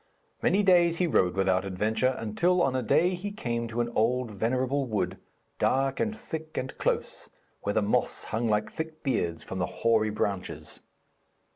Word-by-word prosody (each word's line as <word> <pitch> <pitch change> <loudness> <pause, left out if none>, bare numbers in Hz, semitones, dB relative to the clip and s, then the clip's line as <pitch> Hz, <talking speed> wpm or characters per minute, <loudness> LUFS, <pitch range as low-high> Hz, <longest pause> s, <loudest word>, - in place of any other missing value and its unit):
Many 205 +2 +3
days 175 -3 +5
he 180 - +2
rode 90 - +2
without 95 -1 +2
adventure, 110 +7 0
until 175 +12 +1
on 130 -1 +1
a 130 - +1
day 165 +9 +3
he 185 +3 -4
came 120 - -3
to 115 +1 -2
an 120 - -1
old 120 +1 +1
and 100 - -11
venerable 130 +4 0
wood, 95 -4 -2 0.4
dark 135 0 +1
and 220 -1 -1
thick 160 -9 -7
and 130 - -3
close, - - -2 0.3
where 100 - -1
the 110 - +2
moss 115 +4 0
hung 115 +2 -2
like 105 -1 +1
thick 160 0 -6
beards 85 - -1
from 95 - -5
the 90 - 0 0.2
hoary 110 -2 +4
branches. 100 -3 -3
120 Hz, 175 wpm, -28 LUFS, 105-155 Hz, 0.4 s, days